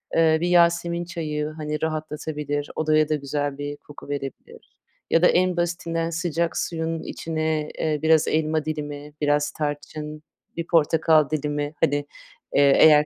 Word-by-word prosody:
eee, 160 -1 +5
bir 175 - +1
yasemin 170 0 +3
çayı, 155 -3 -3
hani, 150 -1 -3
rahatlatabilir, 150 -2 -3
odaya 155 -1 +2
da 155 - +2
güzel 145 0 -3
bir 145 0 -5
koku 145 -1 -13
verebilir. 140 -1 -7 0.3
Ya 165 - +4
da 180 - +7
en 180 0 +2
basitinden 170 -1 -1
sıcak 170 0 -1
suyun 165 -1 -2
içine, 155 -1 -2
eee, 155 -2 0
biraz 160 0 +4
elma 155 0 +1
dilimi, 150 -1 -5
biraz 145 0 +2
tarçın, 150 0 -5 0.3
bir 170 0 -3
portakal 160 -2 +4
dilimi, 145 0 -2
hani, 145 - +3 0.6
eee, 140 -1 +6
eğer 150 -1 +7
155 Hz, 145 wpm, -24 LUFS, 150-165 Hz, 0.6 s, da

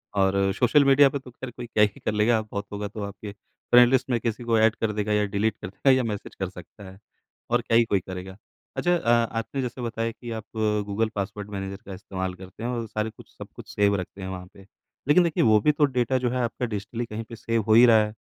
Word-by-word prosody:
और 95 0 +2
social 135 +3 +4
media 140 +1 +7
पे 140 - -3
तो 130 -2 -13
ख़ैर 130 +1 -8
कोई 120 +1 -8
क्या 105 -2 +3
ही 105 -2 0
कर - - -2
लेगा 110 +1 +3
बहुत 105 -1 -6
होगा 105 0 -4
तो 105 +1 -8
आपके 100 +1 -7 0.4
फ्रेंड 120 0 +8
लिस्ट 130 0 +2
में 120 -2 +1
किसी 115 +1 -3
को 115 -1 +2
ऐड 110 0 +4
कर 110 -1 -1
देगा 105 0 -1
या 105 0 +2
डिलीट 110 +1 +1
कर - - -5
देगा 130 +8 +2
या 130 - +1
मैसेज 105 -3 -5
कर 95 -2 -3
सकता 95 +2 -13
है। 95 +1 -14 0.5
और 120 0 +2
क्या 115 -1 +2
ही 120 - +6
कोई 100 -3 +1
करेगा। 95 +1 -8 0.4
अच्छा 175 0 +2
अ, 140 - -2 0.2
आपने 115 +4 -3
जैसे 125 0 -5
बताया 115 -1 -2
कि 120 +1 -9
आप 110 - -7 0.4
गूगल 110 +2 -1
पासवर्ड 105 0 -4
मैनेजर 95 -1 -5
का 95 - -7
इस्तेमाल 95 -1 -5
करते 95 +4 -11
हैं 120 - -1
और 115 -2 -3
सारे 110 +1 -2
कुछ 110 - -16
सब - - -8
कुछ - - -11
सेव 100 0 +3
रखते 95 +1 -6
हैं 95 - -5
वहाँ 90 -1 -7
पे। 95 - -16 0.4
लेकिन 160 +5 +6
देखिए 165 -2 +1
वो 110 -2 +5
भी 150 - +4
तो 145 0 +3
डेटा 130 -1 0
जो 125 -1 0
है 125 +1 -1
आपका 120 +1 -2
डिजिटली 115 +2 -4
कहीं 115 0 -6
पे 115 - -7
सेव 115 0 -1
हो 110 - +5
ही 120 +2 +8
रहा 110 -2 +6
है। 105 - -7
110 Hz, 255 wpm, -25 LUFS, 100-120 Hz, 0.5 s, फ्रेंड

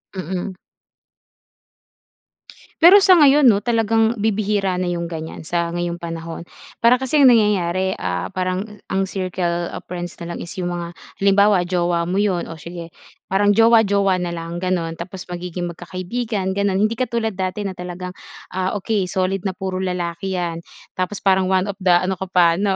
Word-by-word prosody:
Mm. 185 +1 -4 2.3
Pero 355 +5 +9
sa 380 -2 +6
ngayon 295 -4 +6
'no, 210 -4 +5
talagang 225 -1 +1
bibihira 205 -2 0
na 180 - -1
yung 170 -1 -2
ganiyan 160 -1 -7
sa 170 0 -1
ngayong 175 0 -3
panahon. 165 -1 -6 0.4
para 240 +2 +5
kasing 265 +1 +4
ang 240 - +7
nangyayari, 190 -3 +1
ah, - - -2
parang 185 +3 -3
ang 195 0 0
circle 180 -2 -2
of - - -8
friends 175 -1 -6
na 170 0 -6
lang - - -6
is 170 - -8
yung 175 -1 -2
mga, 170 -1 -4 0.3
halimbawa 200 -1 +4
jowa 175 -1 0
mo 185 - -1
yun 195 -5 0
o 165 - -8
sige 170 +1 -8 0.4
parang 205 +2 +3
jowa 225 0 +6
jowa 195 -2 +2
na 175 -1 -3
lang 165 0 -5
ganun. 175 -3 -2
Tapos 185 +1 -8
magiging 175 0 -4
magkakaibigan 190 +3 -4
ganun, 200 -1 +1
hindi 230 - -5
katulad 230 -5 -2
dati 185 +2 -2
na 195 -2 -4
talagang, 180 +1 -7 0.3
ah, 185 0 -2
okey 205 -1 0
solid 190 +1 -2
na 190 - -1
puro 190 0 -4
lalaki 180 0 -3
yan, 170 -2 -3 0.3
tapos 185 +2 -2
parang 190 -1 +3
1 190 +1 +1
of 200 - -5
the 185 -3 +3
ano 185 +2 +2
ka 190 - -4
pa 170 -2 +4
'no, 195 -1 +1
185 Hz, 170 wpm, -20 LUFS, 175-205 Hz, 2.3 s, Pero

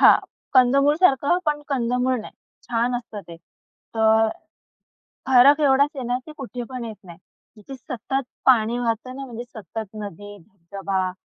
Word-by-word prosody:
हां, - - +8 0.4
कंदमूळसारखं 280 +5 +4
पण 295 0 0
कंदमूळ 250 -1 0
नाही. - - -10 0.4
छान 240 +1 0
असतं 230 -4 -7
ते. 170 - -9 0.6
तर 220 0 +4 1.0
फरक 265 +3 +7
एवढाच 280 0 +4
आहे 260 -3 -5
ना, 245 +1 0
की 310 - -10
कुठे 250 -2 -6
पण 250 -2 -5
येत 220 -2 -7
नाही. 170 -2 -12 0.4
जिथे 240 +6 -10
सतत 265 +1 -4 0.2
पाणी 235 -2 +4
वाहतं 240 +2 -2
ना, 275 - -6
म्हणजे 240 -2 -7
सतत 220 -1 -7 0.2
नदी, 205 +1 -9
धबधबा, 190 +1 -4
245 Hz, 145 wpm, -23 LUFS, 220-265 Hz, 1.0 s, हां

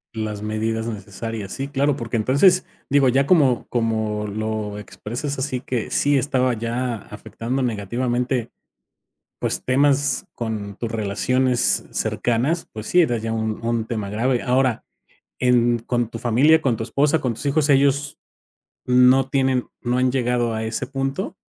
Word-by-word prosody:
Las 105 -1 -4
medidas 110 +1 -2
necesarias, 105 -1 -6
sí, 135 +1 -4
claro, 140 0 +1
porque 115 -2 -3
entonces 140 - +4 0.2
digo, 140 -2 +4
ya 135 +3 +3
como 140 -7 +3
como 110 -3 -1
lo 110 0 -3
expresas 120 +7 -5
así 130 -1 -2
que 125 -3 -3
sí 145 -1 +3
estaba 130 -1 +1
ya 120 +1 -2
afectando 130 +4 -4
negativamente, 120 +2 -1 0.9
pues, - - -2
temas 140 +1 +2
con 105 -4 -4
tus 115 -1 -4
relaciones 125 +4 +1
cercanas, 125 +8 0
pues 110 0 -6
sí, 180 - +4
era 120 -9 +2
ya 115 0 -3
un 110 0 -3
un 115 -1 0
tema 105 -4 -4
grave. 120 +4 0
Ahora, 125 -1 +1 0.5
en 120 -1 +3
con 120 0 -2
tu 115 - -6
familia, 130 +8 +4
con 125 -4 +2
tu 110 - -6
esposa, 145 +6 +1
con 120 -3 -1
tus 140 - -8
hijos, 145 +1 +1
¿ellos 140 +1 +2 0.7
no 125 +1 +5
tienen 130 -2 +1
no 125 +1 0
han 130 0 +2
llegado 120 -2 0
a 110 - -3
ese 110 +4 -2
punto? 135 - -3
125 Hz, 150 wpm, -22 LUFS, 110-135 Hz, 0.9 s, no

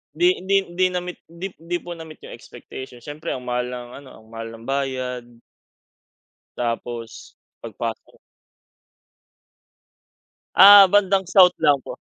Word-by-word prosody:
'di 355 +1 +3 0.2
'di 195 0 +3
'di 185 +1 +1
na-meet 180 0 -5
'di 170 +3 -7
'di 175 +2 -3
po 175 - -9
na 165 -1 -8
meet 155 - -15
yung - - -11
expectation, 125 -2 -11
siyempre 150 +2 -6
ang 125 - -8
mahal 125 0 -2
ng 125 -1 -7
ano, 135 -2 -15
ang - - -23
mahal 115 0 -7
ng 115 - -14
bayad. 130 -2 -3 1.3
Tapos 115 -1 -5 0.2
pagpasok 115 0 -7 2.4
Ah, 200 -1 +9
bandang 195 -1 +2
South 185 -2 +6
lang 140 -3 +2
po. - - -9
140 Hz, 135 wpm, -22 LUFS, 125-180 Hz, 2.4 s, Ah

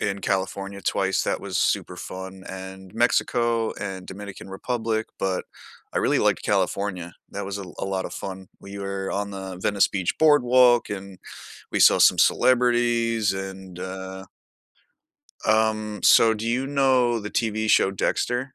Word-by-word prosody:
in 100 -1 -1
California 100 +1 -3
twice, 95 -1 0
that - - -1
was - - -4
super - - 0
fun, 95 0 -8
and 95 0 -9
Mexico 115 -1 +1
and 95 -2 -6
Dominican 100 0 -9
Republic, 110 +2 -2
but 95 -1 -1 0.5
I - - +2
really - - +2
liked - - +1
California, 90 -4 -1 0.2
that 100 0 -5
was 100 +1 -4
a 100 - -5
l 90 - -12
a - - -3
lot 95 -1 -2
of - - -6
fun, 95 -1 -7
we 100 0 -10
were 100 -1 -4
on 100 +1 -2
the 95 -2 -7
Venice 100 -1 +3
Beach 95 -3 -1
boardwalk 125 -6 +5
and 100 -2 -7 0.5
we - - 0
saw - - +7
some - - +5
celebrities 120 -4 +3
and, 95 -1 -7
uh 95 +1 -7 1.2
Um, 110 -1 +1
so 115 -1 +6
do 110 +1 -5
you 125 +3 0
know 130 -4 +2
the 105 0 -7
TV 110 -1 -1
show 95 - +4
Dexter? 120 +6 -1
100 Hz, 155 wpm, -24 LUFS, 95-115 Hz, 1.2 s, saw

